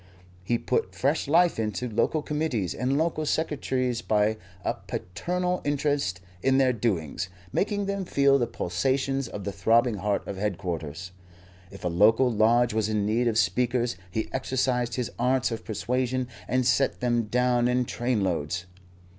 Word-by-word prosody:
He 120 +5 +1
put 125 - -1
fresh 140 +3 0
life 170 -1 +4
into 110 +3 -2
local 120 +7 0
Committees 150 - -1
and 130 +3 0
local 160 0 0
Secretaries 130 -6 -1
by 110 -1 +1 0.3
a - - +1
paternal 180 - -2
interest 145 -10 0 0.2
in 135 0 +3
their 130 -2 +4
doings, 90 - -2 0.2
making 205 0 0
them 200 0 -2
feel 140 -4 +3
the 120 - +1
pulsations 135 +10 -1
of 100 - -7
the 100 - -3
throbbing 115 +2 +2
heart 100 +1 -1
of 100 - -5
headquarters. 90 -4 -3 0.6
If 100 - -12
a - - +3
local 110 +9 +4
lodge 115 +2 +3
was 110 -1 0
in 105 -2 0
need 115 +3 +1
of 110 -2 +1
speakers, 120 -2 +1
he 110 +5 -2
exercised 130 -2 0
his 125 -3 -2
arts 125 +1 +2
of 110 -1 -4
persuasion 125 +3 -1 0.2
and 130 -1 +1
sent 130 +2 +2
them 120 -2 +1
down 125 +1 +2
in 125 0 +1
trainloads. 90 - -1
120 Hz, 155 wpm, -27 LUFS, 105-135 Hz, 0.6 s, life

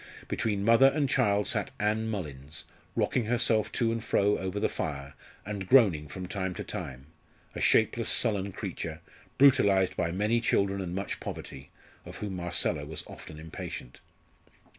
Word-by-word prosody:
Between 100 -3 -1
mother 115 +4 +7
and 140 +1 +1
child 105 -4 +2
sat 105 -4 0
Ann 110 +2 0
Mullins, 75 -8 -5 0.3
rocking 120 - +1
herself 115 -2 +2
to 115 -3 +1
and 115 -1 -3
fro 100 +1 +2
over 95 +2 -3
the - - +2
fire, 70 -2 -4 0.3
and 100 -2 -5
groaning 95 - +5
from 90 +4 -7
time 95 -1 -3
to - - -5
time 65 0 -6 0.5
a - - -5
shapeless - - +3
sullen 100 -2 +2
creature, - - -5 0.4
brutalised 100 -9 +5
by 85 - 0
many 105 +6 +1
children 100 -3 +1
and 90 -1 -4
much 100 0 -3
poverty 65 0 -7 0.3
of - - -9
whom 100 -3 -4
Marcella 85 -3 0
was 75 0 -6
often 75 - -11
impatient. 80 -5 -7
100 Hz, 155 wpm, -29 LUFS, 85-110 Hz, 0.5 s, mother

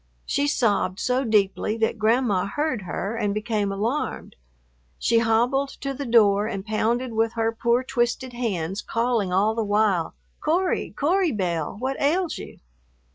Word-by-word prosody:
She 285 +1 0
sobbed 205 -8 +1
so 255 +1 +1
deeply 210 -1 +1
that 225 0 0
Grandma 220 -3 +2
heard 290 +1 -1
her 195 +4 -4
and 205 -3 -1
became 215 -2 -1
alarmed. 225 +9 -3 0.6
She 230 0 +2
hobbled 240 +5 +2
to 275 0 -2
the 275 0 -5
door 210 -3 +4
and 195 -3 -5
pounded 230 +3 0
with 225 +1 +1
her 225 -1 0
poor 235 +2 +1
twisted 250 0 -1
hands, 195 -6 -2
calling 230 -5 0
all 200 +4 +2
the 225 0 -1
while, 205 -5 +1 0.2
"Cory, 355 +4 0
Cory 345 +3 +1
Belle, 175 -7 -2
what 265 +2 -3
ails 335 +5 +1
you?" - - -10
225 Hz, 150 wpm, -24 LUFS, 205-255 Hz, 0.6 s, door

